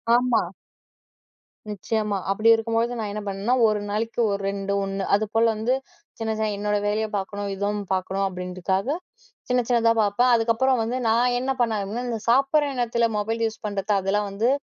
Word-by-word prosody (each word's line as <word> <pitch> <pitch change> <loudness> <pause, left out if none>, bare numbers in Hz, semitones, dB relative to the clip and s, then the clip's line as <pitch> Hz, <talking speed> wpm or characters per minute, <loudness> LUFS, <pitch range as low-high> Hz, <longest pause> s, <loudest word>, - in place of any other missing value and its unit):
ஆமா. 245 -1 +3 1.3
நிச்சியமா. 210 0 -2
அப்டி 215 +3 +3
இருக்கும்பொழுது, 230 +1 -1
நா - - -2
என்ன 210 +1 -4
பண்ணேனா. 200 +5 -1
1 215 -1 +1
நாளைக்கு 225 +3 -2
1 200 - -1
2 200 0 -3
ஒண்ணு. 195 0 -3
அதுபோல 215 +2 +1
வந்து, 220 +4 0 0.5
சின்ன 225 -1 -1
சின்ன 220 0 0
என்னோட 210 0 0
வேலைய 215 +1 0
பாக்கணும். 200 +1 -4
இதுவும் 205 +1 -2
பாக்கணும். 190 +1 -1
அப்டின்றக்காக, 185 +2 -3 0.6
சின்ன 250 0 +3
சின்னதா 230 -2 +4
பாப்பேன். 240 +5 +2
அதுக்கப்பறம் 235 +2 +2
வந்து, 235 +3 -2
நான் 245 +2 +3
என்ன 260 +2 -1
பண்ண, 225 -3 +1 0.3
இந்த 230 -2 -2
சாப்பிட்ற 275 +4 +3
நேரத்துல 235 -1 +1
மொபைல் 225 +2 -1
யூஸ் 220 - -9
பண்றது, 200 0 -2
அதெல்லா 195 +2 0
வந்து 210 +5 0
220 Hz, 155 wpm, -24 LUFS, 200-235 Hz, 1.3 s, சின்னதா